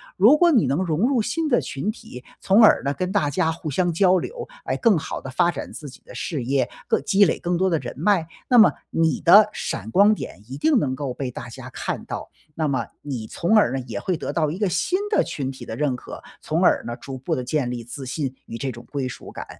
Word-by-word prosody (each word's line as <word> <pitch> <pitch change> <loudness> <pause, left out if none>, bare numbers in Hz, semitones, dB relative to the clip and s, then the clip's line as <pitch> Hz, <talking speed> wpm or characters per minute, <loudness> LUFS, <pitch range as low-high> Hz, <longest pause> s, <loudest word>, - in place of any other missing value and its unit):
如 225 +11 +6
果 345 +1 +5
你 165 - 0
能 140 +5 0
融 175 +6 +1
入 260 -4 +2
新 325 +8 -1
的 245 -5 +3
群 140 +10 -4
体， 125 - -8 0.2
从 195 +4 +4
而 220 - +6
呢 140 +1 0
跟 185 +4 -3
大 180 -8 +2
家 155 +3 +1
互 160 -2 -4
相 175 +4 +1
交 185 +2 +4
流， 480 - -5 0.2
来 - - -1
更 225 -6 +3
好 - - -5
地 135 - -7
发 170 +6 +2
展 155 - -7
自 150 - -8
己 - - -15
的 - - -13
事 150 -8 -3
业， 130 0 0 0.2
更 - - +2
积 195 +7 +4
累 170 - +2
更 175 +1 -1
多 190 +2 +2
的 165 - +2
人 - - -6
脉， 190 -6 +2 0.2
那 245 - +5
么 220 - +7 0.2
你 165 -1 +1
的 205 +5 +8
闪 100 - -4
光 200 - +5
点， 100 - -7
一 135 - -6
定 285 - +3
能 140 - 0
够 135 -2 -4
被 130 -1 -4
大 140 -3 -8
家 120 - -9
看 - - -4
到。 - - -6 0.3
那 160 -1 0
么 130 -5 -1 0.2
你 130 -6 -5
从 175 - +1
而 205 - +4
呢， 135 - -2
也 - - -4
会 185 -3 -1
得 - - -4
到 155 -3 +1
一 170 - -5
个 210 - +2
新 185 - 0
的 420 - +3
群 135 -3 -4
体 130 -2 -8
的 110 - -6
认 145 -3 0
可， 125 - -9 0.2
从 - - -1
而 - - +4
呢， 120 0 -5
逐 135 -1 -8
步 130 - -3
地 125 - -2
建 130 -2 -1
立 120 -2 -5
自 130 +3 -7
信 135 0 -3
与 115 - -6
这 135 +2 -3
种 120 -1 -9
归 140 -3 -2
属 120 - -9
感。 - - -7
155 Hz, 275 characters per minute, -23 LUFS, 130-195 Hz, 0.3 s, 的